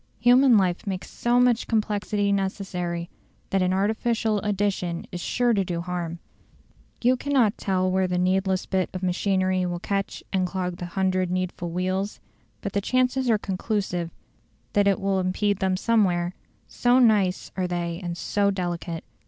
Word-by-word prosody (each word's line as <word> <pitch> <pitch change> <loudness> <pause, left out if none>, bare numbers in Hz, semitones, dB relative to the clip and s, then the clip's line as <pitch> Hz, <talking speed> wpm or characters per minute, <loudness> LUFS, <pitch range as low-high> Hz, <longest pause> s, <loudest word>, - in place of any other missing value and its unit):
Human 245 0 +6
life 185 -1 0
makes 190 -1 -4
so 240 +1 +1
much 245 -2 +3
complexity 210 -2 0
necessary 185 -3 -2 0.4
that 195 - +2
an 185 0 +2
artificial 220 +2 +1
addition 195 -4 -1
is 175 - -5
sure 245 +4 +1
to 200 -3 +2
do 175 -2 -3
harm: 175 -1 -4 0.9
you 250 +2 +5
cannot 255 -6 +2
tell 185 -1 0
where 190 0 +2
the 180 0 -1
needless 185 +1 +1
bit 190 -1 0
of 185 - -4
machinery 185 0 +1
will 175 0 -2
catch 195 +2 -3
and 185 -1 +1
clog 180 -1 -3
the 175 - -5
hundred 185 0 0
needful 180 -1 -2
wheels; 185 +3 -2 0.4
but 200 - -4
the 200 - +1
chances 255 +3 +1
are 220 - +4
conclusive 190 -3 -2 0.6
that 205 -1 +3
it 195 - +3
will 195 -1 0
impede 190 +2 0
them 190 -1 +1
some 230 +2 +3
where, 175 -1 0 0.3
so 245 +1 +2
nice 210 -7 +3
are 185 -1 -1
they 170 -1 -3
and 175 -1 -4
so 200 +2 +1
delicate. 175 -3 -3
190 Hz, 160 wpm, -25 LUFS, 180-210 Hz, 0.9 s, Human